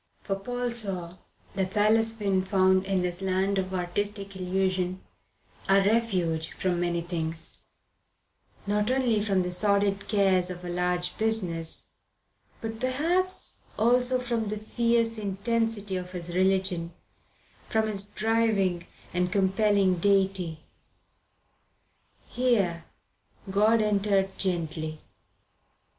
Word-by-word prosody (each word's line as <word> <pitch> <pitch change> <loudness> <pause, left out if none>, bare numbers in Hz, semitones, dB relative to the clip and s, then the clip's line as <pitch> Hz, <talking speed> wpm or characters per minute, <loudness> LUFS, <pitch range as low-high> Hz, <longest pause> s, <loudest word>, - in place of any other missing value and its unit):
For 195 - -1
Paul 245 +4 -3
saw 185 -6 -2 0.4
that 190 0 -2
Silas 225 +2 +3
Finn 195 -3 +1
found 190 0 +3
in 190 -2 +1
this 175 +1 -3
land 190 +1 +1
of 185 0 -3
artistic 200 +2 -2
illusion 185 0 -1 0.7
a 195 - +6
refuge 195 -6 +1
from 180 -2 -1
many 175 -1 0
things; 165 -1 -4 1.1
not 210 +2 0
only 250 -5 +2
from 195 -3 +1
the 180 - -3
sordid 200 +1 +1
cares 190 -3 +3
of 180 0 -7
a - - -4
large 180 0 -1
business, 185 -8 -1 0.8
but 225 0 -5
perhaps 330 +9 0 0.2
also 245 +3 +3
from 235 -3 -2
the 215 +1 -3
fierce 230 +1 0
intensity 205 0 -1
of 180 0 -7
his 175 -1 -5
religion, 185 -2 +1 0.8
from 220 -1 +2
his 200 -2 0
driving 210 -5 0 0.3
and 180 0 0
compelling 195 -1 +2
deity. 190 -4 +1 1.7
Here 205 -9 +1 0.7
God 215 +3 +4
entered 200 -2 +1
gently. 160 -4 -1
195 Hz, 110 wpm, -27 LUFS, 180-220 Hz, 1.7 s, a